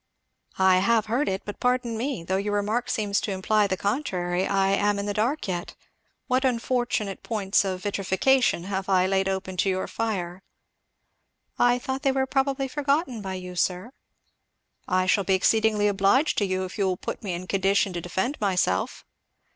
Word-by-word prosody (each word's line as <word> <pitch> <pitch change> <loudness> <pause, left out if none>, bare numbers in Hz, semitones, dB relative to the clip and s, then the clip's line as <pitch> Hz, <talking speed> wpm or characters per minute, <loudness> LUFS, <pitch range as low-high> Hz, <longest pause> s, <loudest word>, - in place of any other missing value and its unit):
'" - - -52
"I 190 -1 +5
have 225 +2 +2
heard 240 +7 0
it; 190 0 -3
but 205 - -7
pardon 250 -2 0
me, 240 -5 -3
though 190 +3 -1
your 205 +1 -1
remark 215 +4 -1
seems 205 -3 0
to 210 - -3
imply 205 +2 +2
the 190 -1 -1
contrary 185 -6 -1
I 195 0 +2
am 205 +1 +2
in 200 - -3
the 205 - -2
dark 235 +8 -1
yet. 175 -2 -4 0.5
What 255 +1 +1
unfortunate 240 -5 -1
points 205 -4 +1
of 185 -2 -4
vitrification 205 +2 +1
have 190 0 -4
I 185 -1 +4
laid 190 0 +1
open 190 -1 -4
to 195 - +2
your 185 0 -1
fire?" 185 -5 -3 1.2
"I 245 0 +4
thought 265 +2 -4
they 275 -2 +2
were 265 0 +1
probably 270 0 0
forgotten 280 -3 -1
by 190 -1 -4
you, 180 -1 -7
sir." 180 +6 -1 1.0
"I 185 0 +2
shall 200 +2 +2
be 190 0 +2
exceedingly 215 +1 +2
obliged 205 +9 +2
to 205 - +1
you 185 0 -1
if 185 - -9
you 195 - +2
will 185 -1 -1
put - - -5
me 195 -4 -3
in 175 +1 -5
condition 195 0 +1
to 175 - -4
defend 190 - -2
myself." 180 - 0
200 Hz, 185 wpm, -25 LUFS, 190-240 Hz, 1.2 s, I